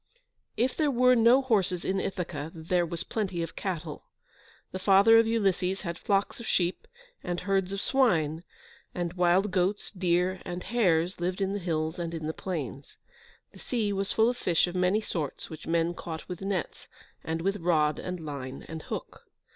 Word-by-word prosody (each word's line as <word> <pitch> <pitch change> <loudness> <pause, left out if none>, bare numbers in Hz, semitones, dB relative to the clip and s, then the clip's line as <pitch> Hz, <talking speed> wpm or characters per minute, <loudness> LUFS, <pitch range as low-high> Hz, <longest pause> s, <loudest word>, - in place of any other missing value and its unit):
If 250 +3 +1
there 305 -2 +2
were 255 -1 +5
no 240 +3 +5
horses 195 -8 +1
in 190 0 0
Ithaca, 165 -6 -4
there 170 +2 0
was 165 0 -4
plenty 190 -6 -2
of 165 - -7
cattle. 170 -5 -4 0.7
The 185 - -4
father 200 +4 +6
of 225 - +3
Ulysses 195 -4 +1
had 170 -2 -5
flocks 200 +2 0
of 235 - -7
sheep, 175 0 0 0.4
and 175 0 -3
herds 195 -1 0
of 195 0 -3
swine, 165 - +2 0.5
and 175 -1 -2
wild 180 +3 +3
goats, 185 +2 0
deer, 180 -1 +1
and 180 0 -5
hares 185 -6 +1
lived 180 +2 -1
in 195 0 0
the 205 - -2
hills 160 -2 -2
and 170 -1 -3
in 160 -1 -5
the 160 - -2
plains. 145 -8 -5 0.5
The - - -15
sea 220 -5 -1
was 195 0 -1
full 220 0 +4
of 245 - -2
fish 170 -7 +2
of 175 - -5
many 185 +4 +2
sorts, 160 -8 -4
which 160 - -9
men 165 +1 +1
caught 160 -2 -7
with 180 -1 -6
nets, 195 -3 -3 0.4
and 165 +1 -3
with 195 +2 +1
rod 160 -4 +2
and 180 -3 -5
line 135 -3 -6
and 160 0 -6
hook. - - -7
180 Hz, 180 wpm, -28 LUFS, 165-200 Hz, 0.7 s, father